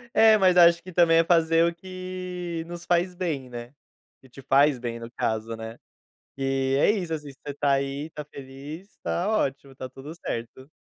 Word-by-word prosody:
É, 220 Hz, -1 st, +7 dB
mas 185 Hz, -2 st, +4 dB
acho 170 Hz, -1 st, +6 dB
que, 185 Hz, -, -10 dB
também, 165 Hz, -1 st, +5 dB
é -, -, +5 dB
fazer 165 Hz, -1 st, +4 dB
o 170 Hz, -, 0 dB
que 185 Hz, -1 st, -6 dB
nos 175 Hz, 0 st, -8 dB
faz 180 Hz, +1 st, +1 dB
bem, 155 Hz, -8 st, -3 dB
né, 120 Hz, +2 st, -8 dB, 0.5 s
que 130 Hz, -, -19 dB
te 135 Hz, -, -12 dB
faz 140 Hz, +1 st, +4 dB
bem 115 Hz, -1 st, -4 dB
no 115 Hz, 0 st, -8 dB
caso, 110 Hz, 0 st, -2 dB
né, 110 Hz, +1 st, -8 dB, 0.6 s
e, 135 Hz, 0 st, 0 dB
é -, -, +4 dB
isso, 180 Hz, -6 st, -2 dB
assim, 150 Hz, -2 st, -5 dB
você 140 Hz, +1 st, -8 dB
tá 145 Hz, 0 st, 0 dB
aí, 140 Hz, +3 st, -2 dB
tá 150 Hz, 0 st, -7 dB
feliz, 145 Hz, +7 st, -10 dB
tá 180 Hz, +4 st, -1 dB
ótimo, 140 Hz, -10 st, -1 dB
tá 130 Hz, -, -6 dB
tudo 135 Hz, +4 st, -10 dB
certo. 120 Hz, -3 st, -6 dB
150 Hz, 190 wpm, -26 LUFS, 135-175 Hz, 0.6 s, É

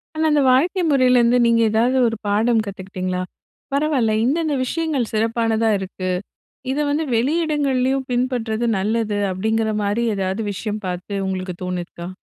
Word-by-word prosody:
ஆனா, 315 Hz, 0 st, 0 dB
அந்த 295 Hz, -, +3 dB
வாழ்க்கை 340 Hz, +9 st, +2 dB
முறையிலேருந்து, 250 Hz, -3 st, +4 dB
நீங்க 230 Hz, 0 st, +3 dB
ஏதாவது 240 Hz, +4 st, +2 dB
ஒரு 225 Hz, -1 st, -2 dB
பாடம் 220 Hz, +2 st, +2 dB
கத்துக்கிட்டீங்களா? 185 Hz, -2 st, -4 dB, 0.5 s
“பரவாயில்ல, 280 Hz, -6 st, +1 dB
இந்தந்த 310 Hz, +3 st, +1 dB
விஷயங்கள் 295 Hz, -4 st, -1 dB
சிறப்பானதா 225 Hz, 0 st, +1 dB
இருக்கு. 185 Hz, -1 st, -5 dB, 0.6 s
இதை 295 Hz, +2 st, 0 dB
வந்து 305 Hz, +2 st, 0 dB
வெளியிடங்கள்லேயும் 270 Hz, -2 st, +1 dB
பின்பற்றுவது 240 Hz, -2 st, -1 dB
நல்லது” 210 Hz, +1 st, -1 dB
அப்படீங்கிற 220 Hz, +3 st, 0 dB
மாதிரி, 205 Hz, +4 st, 0 dB
ஏதாவது 190 Hz, +3 st, -2 dB
விஷயம் 210 Hz, +2 st, -4 dB
பார்த்து 180 Hz, +2 st, -4 dB
உங்களுக்கு 185 Hz, -1 st, -4 dB
தோணிருக்கா? 175 Hz, -1 st, -5 dB
230 Hz, 130 wpm, -21 LUFS, 205-265 Hz, 0.6 s, முறையிலேருந்து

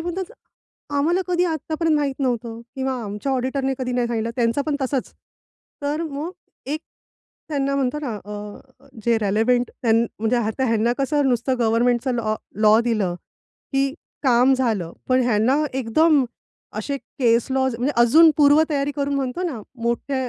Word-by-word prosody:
म्हणतात, 350 Hz, +3 st, -3 dB, 0.7 s
"आम्हाला 335 Hz, +6 st, +2 dB
कधी 355 Hz, 0 st, +1 dB
आत्तापर्यंत 320 Hz, -1 st, 0 dB
माहीत 280 Hz, -2 st, -1 dB
नव्हतं 235 Hz, -3 st, -2 dB, 0.2 s
किंवा 265 Hz, 0 st, -1 dB
आमच्या 210 Hz, +6 st, -3 dB
ऑडिटरने 265 Hz, +1 st, -1 dB
कधी 250 Hz, -1 st, -2 dB
नाही 245 Hz, -1 st, +1 dB
सांगितलं" 230 Hz, -1 st, -2 dB
त्यांचं 240 Hz, +3 st, +1 dB
पण 295 Hz, -2 st, 0 dB
तसच. 265 Hz, -1 st, -2 dB, 0.7 s
तर 295 Hz, +3 st, -1 dB
मग 310 Hz, +2 st, -4 dB, 0.4 s
एक 310 Hz, +1 st, -2 dB, 0.7 s
त्यांना 275 Hz, -2 st, 0 dB
म्हणतात 275 Hz, +2 st, -1 dB
ना 245 Hz, -6 st, -3 dB
अ, 210 Hz, +6 st, -10 dB, 0.2 s
जे 235 Hz, -1 st, +3 dB
रिलेव्हंट 225 Hz, +4 st, +1 dB
त्यां 225 Hz, -2 st, +3 dB, 0.2 s
म्हणजे 225 Hz, +3 st, +1 dB
आता 235 Hz, +2 st, -1 dB
ह्यांना 230 Hz, +1 st, +2 dB
कसं 280 Hz, 0 st, +1 dB
नुसतं 250 Hz, +1 st, 0 dB
गव्हर्नमेंटचं 240 Hz, +2 st, +2 dB
लॉ 220 Hz, -2 st, 0 dB, 0.3 s
लॉ 215 Hz, +1 st, +6 dB
दिलं, 215 Hz, -7 st, 0 dB, 0.6 s
की 275 Hz, 0 st, +1 dB, 0.3 s
काम 255 Hz, -1 st, +4 dB
झालं. 220 Hz, -10 st, -1 dB, 0.2 s
पण 255 Hz, 0 st, +4 dB
ह्यांना 245 Hz, +5 st, +2 dB
एकदम, 270 Hz, +4 st, +3 dB, 0.5 s
असे 280 Hz, -1 st, -2 dB
केस 235 Hz, -4 st, +1 dB
लॉज 265 Hz, -2 st, +1 dB
म्हणजे 255 Hz, +5 st, 0 dB
अजून 315 Hz, +8 st, +7 dB
पूर्व 295 Hz, +1 st, +6 dB
तयारी 285 Hz, -1 st, 0 dB
करून 280 Hz, 0 st, -1 dB
म्हणतो 270 Hz, +4 st, -2 dB
ना, 300 Hz, -11 st, -3 dB, 0.2 s
मोठे 255 Hz, +2 st, -1 dB
260 Hz, 150 wpm, -22 LUFS, 235-285 Hz, 0.7 s, अजून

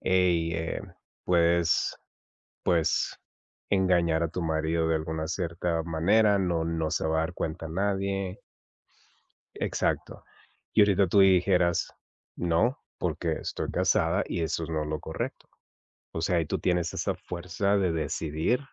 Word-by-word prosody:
"Ey, 90 Hz, -3 st, +2 dB
eh, 80 Hz, 0 st, -3 dB, 0.4 s
pues 85 Hz, -1 st, +2 dB, 0.7 s
pues, 85 Hz, -3 st, +1 dB, 0.5 s
engañar 90 Hz, -4 st, +3 dB
a 85 Hz, -, +1 dB
tu 90 Hz, -, -4 dB
marido, 80 Hz, +1 st, 0 dB
de 80 Hz, -, +2 dB
alguna 80 Hz, 0 st, -3 dB
cierta 85 Hz, -1 st, -1 dB
manera", 100 Hz, +6 st, +3 dB
no 85 Hz, -4 st, 0 dB
no 80 Hz, -1 st, -1 dB
se -, -, -1 dB
va 80 Hz, 0 st, +1 dB
a -, -, +3 dB
dar 80 Hz, +2 st, -2 dB
cuenta 80 Hz, +1 st, -4 dB
a -, -, -8 dB
nadie. 95 Hz, +1 st, -1 dB, 1.2 s
Exacto. -, -, -2 dB, 0.5 s
Y 110 Hz, -, +5 dB
ahorita 100 Hz, -1 st, +4 dB
tú 100 Hz, +4 st, +3 dB
dijeras: 90 Hz, -2 st, +3 dB, 0.5 s
"No, 90 Hz, -, +1 dB, 0.2 s
porque, 80 Hz, -1 st, -1 dB
estoy -, -, -4 dB
casada, 85 Hz, +5 st, +2 dB
y 85 Hz, -, -2 dB
eso 80 Hz, 0 st, -1 dB
es 80 Hz, -, -6 dB
no 80 Hz, -2 st, -1 dB
lo 75 Hz, 0 st, -3 dB
correcto". 80 Hz, -, -5 dB, 0.6 s
O 80 Hz, -, -4 dB
sea, 85 Hz, +1 st, +2 dB
y 80 Hz, -, 0 dB
tú 75 Hz, -, -2 dB
tienes 90 Hz, -2 st, 0 dB
esa -, -, -1 dB
fuerza 90 Hz, +3 st, -1 dB
de 95 Hz, -3 st, +2 dB
decidir 80 Hz, -, -1 dB
85 Hz, 145 wpm, -28 LUFS, 80-95 Hz, 1.2 s, Y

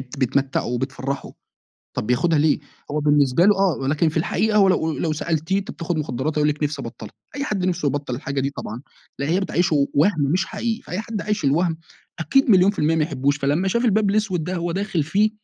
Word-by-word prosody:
بت 135 Hz, +1 st, -10 dB
بتمتعه 135 Hz, +1 st, 0 dB
وبتفرحه، 130 Hz, +2 st, -3 dB, 0.6 s
طب -, -, -3 dB
بياخدها 150 Hz, +7 st, +2 dB
ليه؟ 150 Hz, 0 st, +3 dB, 0.3 s
هو 150 Hz, +1 st, -1 dB
بالنسبة 145 Hz, +1 st, +3 dB
له 205 Hz, -, +6 dB
آه، 190 Hz, -5 st, +2 dB
ولكن 150 Hz, +4 st, +1 dB
في 155 Hz, -, -6 dB
الحقيقة 210 Hz, +6 st, +1 dB
هو 195 Hz, -, +6 dB
لو 160 Hz, -3 st, +1 dB
أ -, -, -4 dB
لو 160 Hz, -2 st, 0 dB
سألتيه 160 Hz, +4 st, -1 dB
أنت 195 Hz, -, -5 dB
بتاخد 170 Hz, -1 st, -3 dB
مخدرات، 150 Hz, +1 st, -2 dB
هيقول 150 Hz, 0 st, +3 dB
لِك 150 Hz, +1 st, -2 dB
نفسي 145 Hz, -2 st, -2 dB
أبطلها. 110 Hz, -2 st, -9 dB, 0.2 s
أي 280 Hz, -, -2 dB
حد 195 Hz, -8 st, -1 dB
نفْسه 180 Hz, -4 st, -1 dB
يبطل 140 Hz, -2 st, -3 dB
الحاجة 140 Hz, +1 st, -3 dB
دي 135 Hz, +1 st, -1 dB
طبعًا 115 Hz, +5 st, -6 dB, 0.4 s
لأن 140 Hz, +1 st, -2 dB
هي 175 Hz, +4 st, +2 dB
بتعيّشه 170 Hz, -7 st, +1 dB
وهم 160 Hz, +2 st, +3 dB
مش 175 Hz, +7 st, +1 dB
حقيقي، 225 Hz, +1 st, -3 dB
فأي 180 Hz, -, -4 dB
حد 220 Hz, -1 st, -5 dB
عايش 210 Hz, -6 st, -2 dB
الوهم 160 Hz, +4 st, +1 dB, 0.4 s
أكيد 245 Hz, -, +2 dB
مليون 190 Hz, -1 st, +6 dB
في 205 Hz, -, -13 dB
المِيَّة 160 Hz, +2 st, +2 dB
ما 160 Hz, -, +2 dB
يحبوش، 140 Hz, -2 st, 0 dB
فلما 145 Hz, +7 st, +1 dB
شاف 235 Hz, +6 st, 0 dB
الباب 210 Hz, -2 st, +3 dB
الأسود 200 Hz, -6 st, 0 dB
ده 180 Hz, -, -3 dB
هو 170 Hz, 0 st, -2 dB
داخل 190 Hz, -3 st, -1 dB
فيه 200 Hz, +9 st, +2 dB
160 Hz, 220 wpm, -22 LUFS, 140-190 Hz, 0.6 s, له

